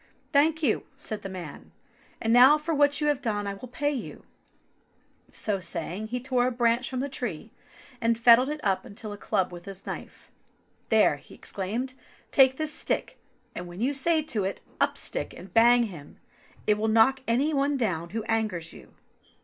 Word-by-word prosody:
Thank 310 Hz, +3 st, +3 dB
you," 235 Hz, -7 st, +1 dB
said 215 Hz, -, -5 dB
the 195 Hz, -, -6 dB
man; 175 Hz, -6 st, -9 dB, 0.5 s
and 225 Hz, 0 st, +1 dB
now 260 Hz, +5 st, +8 dB
for 310 Hz, +2 st, -3 dB
what 290 Hz, 0 st, +3 dB
you -, -, +1 dB
have 295 Hz, -2 st, +1 dB
done 210 Hz, -5 st, -1 dB
I 200 Hz, -, -3 dB
will 200 Hz, +6 st, -9 dB
pay 290 Hz, +4 st, -1 dB
you"; 270 Hz, -5 st, -6 dB, 1.1 s
so 205 Hz, -2 st, -2 dB
saying, 180 Hz, +3 st, -5 dB
he 250 Hz, +3 st, -3 dB
tore 250 Hz, -1 st, +1 dB
a -, -, 0 dB
branch 240 Hz, 0 st, +1 dB
from 255 Hz, -1 st, -3 dB
the 280 Hz, -, -2 dB
tree, 275 Hz, -, -5 dB, 0.5 s
and 230 Hz, 0 st, +2 dB
fettled 235 Hz, +3 st, +6 dB
it 300 Hz, 0 st, -3 dB
up 195 Hz, -2 st, +1 dB
into 215 Hz, +1 st, -8 dB
a -, -, -5 dB
club 190 Hz, -2 st, 0 dB
with 175 Hz, 0 st, -10 dB
his 195 Hz, -1 st, -8 dB
knife. -, -, -8 dB, 0.6 s
"There," 210 Hz, -10 st, +4 dB
exclaimed 220 Hz, +7 st, -4 dB
he; 260 Hz, -, -25 dB, 0.3 s
"take 265 Hz, -2 st, +5 dB
this 310 Hz, -1 st, -2 dB
stick, -, -, -2 dB, 0.3 s
and 175 Hz, -, -6 dB
when 175 Hz, +2 st, -10 dB
you 260 Hz, +5 st, +1 dB
say 310 Hz, +3 st, +2 dB
to 225 Hz, -9 st, -2 dB
it, 195 Hz, +1 st, -3 dB, 0.2 s
*Up, -, -, +1 dB
stick, -, -, -2 dB
and 180 Hz, +1 st, -12 dB
bang 240 Hz, +1 st, +6 dB
him,' 170 Hz, -10 st, -8 dB, 0.5 s
it 210 Hz, 0 st, +2 dB
will 220 Hz, -, 0 dB
knock 225 Hz, +5 st, +4 dB
any 265 Hz, +7 st, +2 dB
one 280 Hz, 0 st, +1 dB
down 175 Hz, -9 st, -1 dB
who 225 Hz, +3 st, -3 dB
angers 215 Hz, -7 st, -2 dB
you." -, -, -15 dB
230 Hz, 190 wpm, -27 LUFS, 200-270 Hz, 1.1 s, now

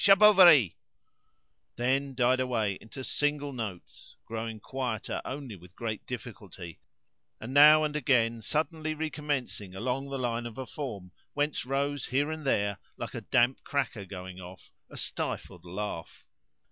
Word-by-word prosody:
Charbovari"), 190 Hz, -, +8 dB, 1.0 s
then 135 Hz, +2 st, 0 dB
died 125 Hz, +1 st, +3 dB
away 110 Hz, -6 st, 0 dB
into 115 Hz, +4 st, -9 dB
single 145 Hz, 0 st, -1 dB
notes, 110 Hz, -8 st, -7 dB
growing 115 Hz, -1 st, -5 dB
quieter 125 Hz, -1 st, -3 dB
only 135 Hz, -5 st, -6 dB
with 90 Hz, 0 st, -16 dB
great 110 Hz, -2 st, -4 dB
difficulty, 100 Hz, -8 st, -8 dB, 0.6 s
and 120 Hz, +4 st, -6 dB
now 150 Hz, +2 st, +8 dB
and 150 Hz, -1 st, -1 dB
again 115 Hz, -6 st, +2 dB
suddenly 155 Hz, -, -1 dB
recommencing 145 Hz, -10 st, -3 dB
along 130 Hz, +6 st, -2 dB
the 135 Hz, -, -3 dB
line 120 Hz, -2 st, -1 dB
of 115 Hz, -, -10 dB
a 130 Hz, -, -4 dB
form 110 Hz, -10 st, -6 dB, 0.2 s
whence 145 Hz, -3 st, -1 dB
rose 140 Hz, +1 st, -1 dB
here 140 Hz, +5 st, +1 dB
and 155 Hz, -2 st, -5 dB
there, 100 Hz, -5 st, +1 dB, 0.2 s
like -, -, -5 dB
a -, -, -4 dB
damp 120 Hz, +2 st, +2 dB
cracker 135 Hz, -7 st, -2 dB
going 95 Hz, -1 st, -8 dB
off, 90 Hz, 0 st, -12 dB, 0.2 s
a -, -, -11 dB
stifled 90 Hz, -1 st, -4 dB
laugh. 90 Hz, -2 st, -6 dB
125 Hz, 140 wpm, -29 LUFS, 105-145 Hz, 1.0 s, Charbovari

